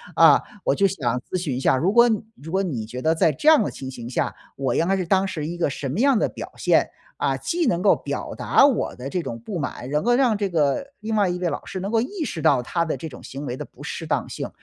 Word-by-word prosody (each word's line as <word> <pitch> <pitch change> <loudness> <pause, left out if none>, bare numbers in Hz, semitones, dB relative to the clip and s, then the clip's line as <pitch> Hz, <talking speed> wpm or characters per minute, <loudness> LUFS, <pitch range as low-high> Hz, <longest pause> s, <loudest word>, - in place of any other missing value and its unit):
啊， - - +7 0.2
我 - - +3
就 200 - +3
想 130 -10 -1
咨 185 - -4
询 145 -8 -2
一 130 - -2
下， 130 - +3
如 180 +9 +1
果 235 +1 +6 0.3
如 160 +3 -10
果 190 +2 +1
你 135 - -3
觉 125 +3 -7
得 160 +3 +2
在 160 - +3
这 225 - -5
样 310 -7 +7
的 - - -3
情 130 - -7
形 120 -2 -7
下， - - -1 0.2
我 135 -3 -1
应 165 - +2
该 195 - +2
是 185 - -2
当 190 +2 +2
时 155 -6 -4
一 175 +2 -5
个 170 - +1
什 135 0 -4
么 140 +10 -3
样 270 -2 +4
的 - - +2
表 - - -8
现？ - - +3 0.3
啊， - - 0
既 340 -2 -1
能 175 -5 +1
够 200 - +5
表 - - -5
达 275 - +4
我 275 -5 +1
的 130 +2 -6
这 180 - -1
种 115 -7 -6
不 180 - -5
满， 140 -4 -5
能 150 +2 0
够 240 0 +3
让 245 -5 +3
这 200 -1 -1
个 155 - +1
另 220 +1 -3
外 200 -3 +3
一 175 - -2
位 180 -1 -1
老 145 - -5
师 185 - -5
能 195 +2 -3
够 225 0 +2
意 315 - -3
识 165 - -4
到 135 -4 +4
他 170 +7 -1
的 160 - -2
这 165 - -6
种 125 -6 -11
行 140 +2 -7
为 125 - -3
的 - - -6
不 - - -16
适 - - -5
当 - - -1
性， - - -5
170 Hz, 310 characters per minute, -23 LUFS, 135-205 Hz, 0.3 s, 啊